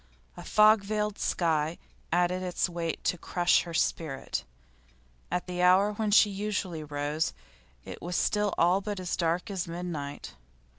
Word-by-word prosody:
A - - -9
fog 215 -1 +5
veiled 210 0 -2
sky 160 -1 0 0.3
added 180 +2 +1
its 180 0 0
weight 170 -2 -4
to 180 - 0
crush 175 +1 +2
her 170 - -7
spirit; 145 -5 -1 0.8
at 180 - -2
the 180 -1 -3
hour 185 +3 +5
when 215 0 -1
she 205 0 +6
usually 195 -5 -3
rose 145 +2 -2 0.5
it - - -8
was 175 +1 -4
still 210 -2 +1
all 180 +3 +3
but 205 -1 -4
as 180 -1 -2
dark 175 +5 -1
as 185 -2 -3
midnight. 165 -4 -5
180 Hz, 150 wpm, -29 LUFS, 165-200 Hz, 0.8 s, she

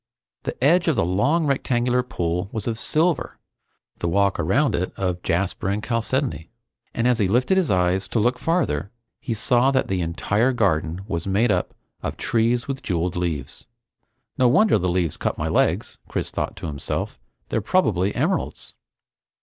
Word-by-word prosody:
The - - -4
edge 170 +5 +4
of 160 - +3
the - - +2
long 140 - +2
rectangular 125 -3 +1
pool 90 -5 -2
was 110 -2 -4
of 115 -2 -2
silver; 160 +6 0 0.6
the 85 - -1
walk 100 +2 +2
around 95 - +2
it 90 - -1
of 90 -2 -1
jasper 95 +1 -1
and 105 +2 -1
chalcedony, 120 - -1 0.4
and 115 +1 0
as 125 -2 +2
he 100 - +3
lifted 125 - +2
his 185 -5 +2
eyes 90 0 +1
to 115 - -1
look 125 +3 +1
farther, 130 - 0 0.3
he 115 - -3
saw 120 +4 +3
that 130 -1 +1
the 95 -2 0
entire 100 +9 +1
garden 90 -6 0
was 85 -3 -3
made 105 +4 +2
up - - -1 0.3
of - - -4
trees 120 +1 +1
with 135 -1 -4
jewel 90 -1 -1
leaves. 85 -6 -4 0.7
No 130 - +5
wonder 195 - +4
the 90 0 0
leaves 85 -3 0
cut - - -2
my - - -2
legs! - - 0
Chris - - -3
thought - - -3
to - - -8
himself. 75 -3 -4 0.3
They're - - 0
probably 95 +3 +1
emeralds! - - -2
105 Hz, 170 wpm, -23 LUFS, 90-125 Hz, 0.7 s, No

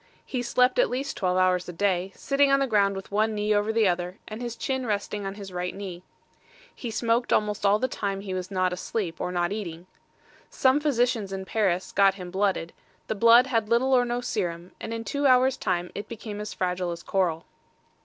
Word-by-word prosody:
He 255 - -3
slept 250 +1 +2
at - - +4
least 265 +3 -3
twelve 185 -2 0
hours 185 -1 +2
a - - -6
day, 190 0 0
sitting 280 0 +2
on 275 - +5
the 275 - +2
ground 200 -5 +2
with 195 +1 -8
one 215 +1 +1
knee 210 0 +1
over 205 +1 +1
the 220 -2 +3
other, 180 +1 -1
and 215 +2 -7
his 240 -1 -4
chin 260 0 -2
resting 205 -1 -2
on 195 - -5
his 200 -3 -9
right 180 0 -3
knee. 190 -3 -7 0.7
He 240 - -6
smoked 230 +2 0
almost 210 -1 +1
all 200 +1 +5
the 255 - 0
time 200 -5 -3
he 195 -2 -5
was 185 -1 -4
not 185 -2 0
asleep 180 -1 -3
or 180 - -2
not 175 0 0
eating. 175 -5 -5 0.6
Some 260 +2 +3
physicians 245 -8 +1
at 190 0 -4
Paris 190 -4 0
got 195 -1 +4
him 180 -2 -8
blooded; 190 -3 0 0.3
the - - -2
blood 230 +3 +6
had 225 -5 0
little 250 +3 +3
or 250 -1 +5
no 240 0 -2
serum, 180 -7 -3
and 225 - -6
in 230 0 -3
two 285 +4 0
hours 255 0 +5
time 175 0 -2
it 205 - -6
became 210 -2 -6
as 210 - -5
fragile 180 -1 -2
as 170 0 -6
coral. 175 -4 0
205 Hz, 215 wpm, -26 LUFS, 185-235 Hz, 0.7 s, blood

